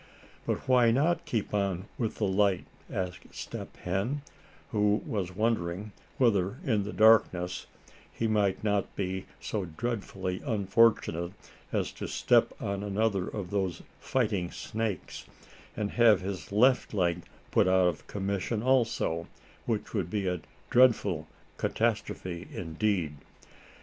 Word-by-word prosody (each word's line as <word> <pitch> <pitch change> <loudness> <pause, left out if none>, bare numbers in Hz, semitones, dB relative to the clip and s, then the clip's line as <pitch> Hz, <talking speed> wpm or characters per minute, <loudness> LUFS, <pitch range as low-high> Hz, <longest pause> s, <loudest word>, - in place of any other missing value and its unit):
"But - - -2
why 125 -2 +5
not 155 +8 +2
keep 115 -11 -2
on 100 -2 0
with 115 -3 -1
the 105 - 0
light?" 100 -1 +2 0.3
asked 90 -1 -4
Step - - -7
Hen, 100 +11 -2 0.5
who 105 -1 +2
was 95 - -3
wondering 105 -2 -1 0.3
whether 105 -4 +2
in 110 -7 +1
the 105 - -4
darkness 95 -6 +4 0.4
he 115 - -2
might 105 -3 +1
not 100 -2 0
be 95 -1 -3
so 105 -4 -3
dreadfully 95 -1 -3
unfortunate 100 - +2 0.4
as - - 0
to - - -6
step - - +3
on 100 0 -2
another 100 -1 0
of 95 -4 -5
those 95 -4 -1 0.2
"fighting 105 -9 0
snakes," 110 -3 -4 0.5
and 105 -1 -1
have 115 -5 +5
his 95 -4 -5
left 125 +2 +3
leg 90 -2 +1 0.3
put - - +4
out 95 0 +4
of 85 -3 -1
commission 100 +2 -2
also, 115 -10 +1 0.4
which 110 -3 -2
would 95 -6 -1
be 100 0 -1
a 90 -2 -1 0.3
dreadful 105 -10 +4 0.3
catastrophe 85 -1 -1
indeed. 85 -2 -1
100 Hz, 130 wpm, -29 LUFS, 90-110 Hz, 0.5 s, why